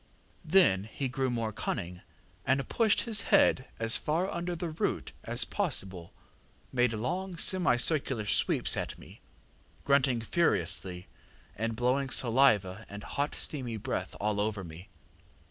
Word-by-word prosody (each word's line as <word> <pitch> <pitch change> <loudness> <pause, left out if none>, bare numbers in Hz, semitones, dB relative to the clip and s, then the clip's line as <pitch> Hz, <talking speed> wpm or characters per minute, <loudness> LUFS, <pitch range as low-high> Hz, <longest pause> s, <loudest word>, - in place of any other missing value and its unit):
Then 155 - +4
he 135 - -3
grew 130 0 -1
more 115 -2 -2
cunning, 90 -4 -4 0.4
and 135 +1 0
pushed 220 -3 +2
his 220 -3 0
head 130 - +4
as 115 0 +3
far 165 +5 -1
under 175 +1 -3
the 170 -1 -4
root 155 - -2
as - - +2
possible, 90 -3 -2 0.6
made 125 -2 +2
long 175 - -3
semicircular 135 - +2
sweeps - - +2
at - - -4
me, - - -15 0.6
grunting 135 -3 +3
furiously, 95 - +1 0.5
and 115 +1 -2
blowing 130 +3 0
saliva 110 -7 +3
and 100 0 -8
hot 145 +1 -3
steamy 125 -6 -3
breath - - -4
all 105 0 -1
over 105 -2 -2
me. 85 +4 -11
125 Hz, 130 wpm, -30 LUFS, 105-150 Hz, 0.6 s, Then